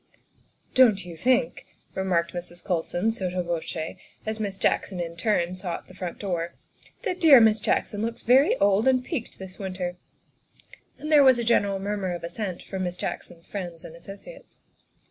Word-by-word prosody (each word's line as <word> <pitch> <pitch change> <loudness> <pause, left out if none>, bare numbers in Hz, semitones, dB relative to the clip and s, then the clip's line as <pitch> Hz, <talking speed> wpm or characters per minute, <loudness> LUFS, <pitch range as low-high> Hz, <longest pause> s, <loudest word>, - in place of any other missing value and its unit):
" - - -38
Don't 220 -7 +5
you 175 -2 -8
think," 250 +7 +1 0.3
remarked 175 -3 0
Mrs. 175 0 -7
Colson 180 +3 0
sotto 185 -4 -2
voce 165 -1 -4 0.3
as 220 0 -3
Miss 200 -3 -3
Jackson 190 -1 0
in 170 -1 -4
turn 175 -2 +1
sought 185 -2 -5
the - - -14
front 180 -2 -5
door, 175 -4 -3 0.2
" - - -25
that 365 - -2
dear 300 -6 +9
Miss 220 -1 +5
Jackson 205 0 0
looks 230 +1 -3
very 260 +4 +5
old 200 +3 +3
and 255 -1 +3
peaked 275 -10 -4
this 190 -1 -10
win 190 -2 -4
ter?" 180 -1 -3 1.0
And 305 - -5
there 295 -2 +8
was 260 -2 +7
a 235 - -1
general 205 -4 +2
murmur 195 -2 -2
of 175 - -8
assent 180 +1 -4
from 190 -1 -5
Miss 180 0 -4
Jackson's 170 -2 -5
friends 175 -5 -6
and 160 - -10
associates. 195 - -11
190 Hz, 180 wpm, -26 LUFS, 175-225 Hz, 1.0 s, dear